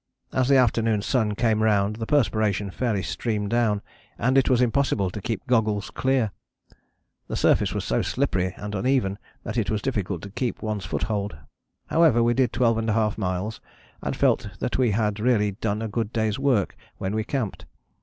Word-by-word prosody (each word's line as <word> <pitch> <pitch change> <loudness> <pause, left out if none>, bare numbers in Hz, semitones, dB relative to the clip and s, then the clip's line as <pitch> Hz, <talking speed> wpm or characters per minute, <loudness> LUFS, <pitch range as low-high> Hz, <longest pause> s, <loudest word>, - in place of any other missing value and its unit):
As 130 -1 +2
the 140 - +6
afternoon 115 -4 +2
sun 110 -4 +1
came 110 -1 +2
round 105 -1 +2
the 115 -1 -4
perspiration 110 -8 +1
fairly 110 -3 -1
streamed 105 -3 -2
down, 110 -4 +1 0.3
and 130 +3 +1
it 135 - +4
was 125 -2 +4
impossible 120 -6 +1
to 105 - -6
keep 115 0 -3
goggles 110 -5 +1
clear. 130 -5 +1 1.0
The - - -4
surface - - +2
was - - -2
so - - +1
slippery 95 0 -1
and 105 0 -6
uneven 105 -2 +1 0.2
that 110 - -4
it 110 - -1
was 110 - 0
difficult 100 -8 -2
to 100 - -8
keep 120 +3 -3
one's 105 -3 -2
foothold. 100 -1 -2 0.5
However 155 -8 +4
we 120 +1 +3
did 125 -1 +2
12½ 115 -3 +1
miles, 95 +3 -2 0.4
and - - -2
felt - - +2
that - - -2
we 125 -2 +3
had 105 0 0
really 105 -3 +2
done 105 +2 -2
a - - -2
good 110 0 -2
day's 110 0 0
work 130 -8 +1 0.2
when 95 +1 -3
we 110 0 0
camped. 115 -3 -3
110 Hz, 175 wpm, -25 LUFS, 105-120 Hz, 1.0 s, the